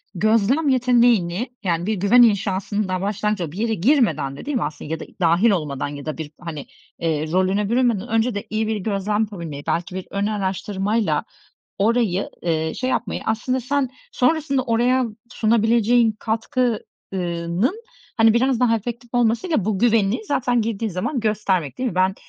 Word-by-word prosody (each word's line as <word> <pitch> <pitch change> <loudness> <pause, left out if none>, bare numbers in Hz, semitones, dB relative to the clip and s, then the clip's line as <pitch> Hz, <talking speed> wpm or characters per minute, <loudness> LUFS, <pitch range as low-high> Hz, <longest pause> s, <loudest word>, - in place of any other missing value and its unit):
gözlem 225 - +2
yeteneğini, 240 -5 +3
yani, 170 -2 0
bir 220 - 0
güven 205 +6 +5
inşasının 205 -2 +2
daha 185 -1 -2
başlangıcı 205 -1 -1
olup, 155 -1 -6
bir - - -9
yere 225 +1 0
girmeden 205 - +2
de - - -9
değil 285 -2 -1
mi - - -1
aslında 150 0 -6
ya 160 - -2
da - - -7 0.2
dâhil 175 +7 +4
olmadan 150 -7 -2
ya 145 0 -8
da 155 - -4
bir, 155 -2 -6
hani, 160 -5 -6 0.3
eee, 160 -2 -1
rolüne 190 +3 +1
bürünmeden 235 -3 +1
önce 225 0 +1
de 205 - -5
iyi 215 0 -1
bir 220 - 0
gözlem 205 +1 -1
yapabilmeyi, 170 -9 -5
belki 175 +2 -1
bir 190 - -5
ön 200 0 -1
araştırmayla 205 +1 -1 0.6
orayı, 210 -3 +1
eee, 160 -2 0
şey 255 0 -2
yapmayı, 225 -5 -2
aslında 255 +4 -1
sen 270 +2 0 0.2
sonrasında 275 0 +1
oraya 245 +2 +2 0.3
sunabileceğin 230 +1 +3
katkı 230 +1 -1 0.3
ııı, 170 -1 -3
nın, 370 - +1 0.3
hani, 225 -1 +5
biraz 255 0 +2
daha 230 -2 +4
efektif 235 +2 -6
olmasıyla 240 - +1
bu 205 -2 0
güveni 230 - +2
zaten 245 - +1
girdiğin 220 0 -2
zaman 195 - -2
göstermek 200 - -1
değil 255 - 0
mi? 190 - -6
Ben, 185 +1 +2
215 Hz, 170 wpm, -22 LUFS, 185-240 Hz, 0.6 s, güven